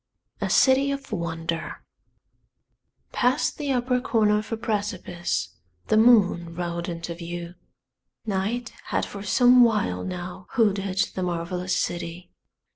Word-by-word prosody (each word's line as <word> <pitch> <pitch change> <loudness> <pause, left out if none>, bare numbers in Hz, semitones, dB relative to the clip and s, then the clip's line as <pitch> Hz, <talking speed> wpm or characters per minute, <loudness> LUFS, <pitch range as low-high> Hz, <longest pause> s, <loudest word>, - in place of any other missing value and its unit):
A - - -1
CITY 270 +1 +4
OF 275 -1 -4
WONDER 165 -3 -4 1.3
Past 250 +5 +1
the 290 -2 -1
upper 250 0 +1
corner 210 -4 +2
of 215 - -8
a 225 - -1
precipice 185 - -2 0.4
the - - +4
moon 195 -7 +4
rode 170 0 -3
into 170 0 -5
view. 170 0 -6 0.7
Night 220 +4 -2
had - - -1
for 200 - -8
some 245 +4 +6
while 210 - +1
now 180 0 -6
hooded 200 -4 +1
the 185 - -3
marvelous 180 +1 -2
city. 175 +1 -4
190 Hz, 120 wpm, -25 LUFS, 175-230 Hz, 1.3 s, some